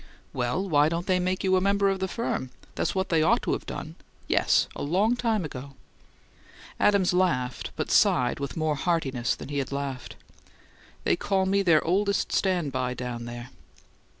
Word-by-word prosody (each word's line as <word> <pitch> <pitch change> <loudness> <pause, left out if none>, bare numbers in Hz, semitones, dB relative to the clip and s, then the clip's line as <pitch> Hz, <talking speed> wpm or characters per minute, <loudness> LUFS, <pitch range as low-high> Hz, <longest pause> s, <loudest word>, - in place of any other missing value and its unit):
"Well, 125 +10 -1
why 150 -3 +4
don't 170 +1 -3
they 185 -1 +2
make 185 +1 -1
you 190 -1 +3
a 185 - +3
member 200 +1 +2
of 195 -1 0
the 190 - -1
firm? 190 - -3 0.2
That's - - -2
what 190 0 -1
they 165 -2 +3
ought 155 - +3
to've - - -2
done! - - -6 0.3
Yes, - - +3
and 145 - -4
long 205 +8 +2
ago!" 150 - -2 1.0
Adams 200 -3 +3
laughed, 150 -9 0
but - - -3
sighed 125 +1 +3
with 140 +1 -5
more 155 -1 +1
heartiness 135 -6 0
than - - -9
he 145 -1 -2
had 135 - -3
laughed. 140 -3 -5 0.9
"They - - +2
call 190 -2 0
me 200 +1 +2
their 170 -5 +3
'oldest 200 +4 +1
stand 180 -7 +1
by' 125 -1 -2
down 120 -2 -5
there." 120 +1 -8
165 Hz, 175 wpm, -26 LUFS, 135-190 Hz, 1.0 s, why